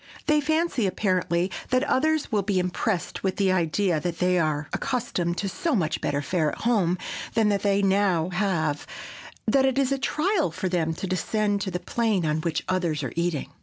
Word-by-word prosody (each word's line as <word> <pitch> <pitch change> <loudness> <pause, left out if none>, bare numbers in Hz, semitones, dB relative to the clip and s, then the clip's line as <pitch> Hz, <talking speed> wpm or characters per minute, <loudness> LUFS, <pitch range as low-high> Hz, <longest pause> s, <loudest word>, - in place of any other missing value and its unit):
They 300 -1 +3
fancy, 315 - +1
apparently, 185 -1 0 0.2
that 255 +1 +2
others 310 +2 +1
will 210 -2 +2
be 200 -1 -1
impressed 180 +1 -1
with 190 -1 -1
the 195 -2 +2
idea 175 0 +1
that 170 +1 -3
they 180 0 +2
are 150 -2 0
accustomed 225 -10 -1
to 200 - -1
so 330 - -1
much 160 -6 0
better 145 0 -1
fare 155 -1 0
at - - -8
home 200 -7 +2 0.4
than 220 -2 +3
that 200 -2 +1
they 200 0 +2
now 190 -4 +2
have 175 -6 -1 0.6
that 265 +5 +3
it 265 0 0
is 275 -1 +2
a 275 - 0
trial 315 - +1
for 170 +3 -3
them 165 -3 0
to 190 - -4
descend 205 +3 0
to 195 - -2
the 180 -1 -3
plane 215 -4 0
on 155 0 0
which 165 -1 -1
others 175 -5 0
are 125 - -4
eating. 170 -3 -1
190 Hz, 195 wpm, -25 LUFS, 170-225 Hz, 0.6 s, They